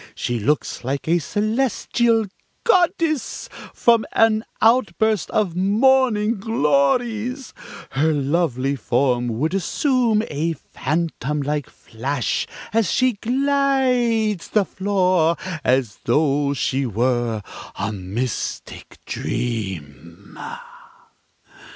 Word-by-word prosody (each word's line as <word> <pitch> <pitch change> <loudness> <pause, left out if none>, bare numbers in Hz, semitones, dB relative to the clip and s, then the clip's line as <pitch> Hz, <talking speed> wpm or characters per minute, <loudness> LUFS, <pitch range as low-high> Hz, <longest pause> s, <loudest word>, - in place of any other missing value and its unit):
She 120 -1 -2
looks 145 +5 -1
like 135 +4 -3
a 170 +2 +3
celestial 225 - +1 0.4
goddess 340 - +1 0.2
from 235 -2 +3
an 220 -1 +3 0.2
outburst 220 -3 +2
of 200 -6 0
morning 220 +2 +3
glories; 225 - 0 0.4
her 155 +4 +2
lovely 140 -2 0
form 125 0 +1
would 155 +7 0
assume 230 - +1
a 160 +3 -1
phantomlike 150 -2 -2
flash 125 +3 -3 0.3
as 225 -5 +2
she 255 -1 +2
glides 250 -4 +1
the 210 -2 +2
floor, 185 -4 +1 0.3
as 125 -4 +1
though 140 +2 +2
she 135 0 0
were 120 -1 0 0.3
a 100 +2 -2
mystic 105 +5 -5
dream." 95 -6 -5
170 Hz, 90 wpm, -21 LUFS, -, 0.4 s, a